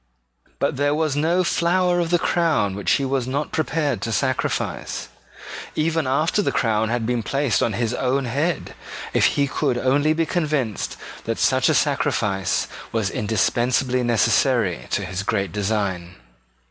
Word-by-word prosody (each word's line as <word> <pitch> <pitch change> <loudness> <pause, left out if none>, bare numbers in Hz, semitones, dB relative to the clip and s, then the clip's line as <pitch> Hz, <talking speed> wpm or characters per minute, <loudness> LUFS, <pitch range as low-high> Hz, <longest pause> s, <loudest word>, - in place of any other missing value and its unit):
But - - -1
there 145 +1 +2
was 155 -2 0
no 165 +5 +2
flower 175 +1 +2
of 170 -1 0
the 175 - +4
crown 165 - +1
which 100 0 0
he 140 - +1
was 130 -2 -1
not 140 +3 -2
prepared 155 -4 -1
to 115 - -3
sacrifice, 130 +4 -2 0.7
even 160 -1 0
after 155 +9 +1
the - - 0
crown 110 -1 +1
had 120 -1 -1
been 120 0 0
placed 135 +2 0
on 115 - +1
his 115 +2 -1
own 130 +2 0
head, 145 +6 -1 0.4
if - - +4
he 140 - +3
could 125 -2 -1
only 145 +5 +2
be 165 +1 0
convinced 150 - -1 0.3
that - - -2
such - - +3
a - - +3
sacrifice 95 -3 0 0.2
was 110 -3 -1
indispensably 125 +4 +1
necessary 115 - +2
to 100 - -1
his 95 +1 -4
great 100 -1 -1
design. 100 -4 -2
130 Hz, 155 wpm, -22 LUFS, 110-155 Hz, 0.7 s, the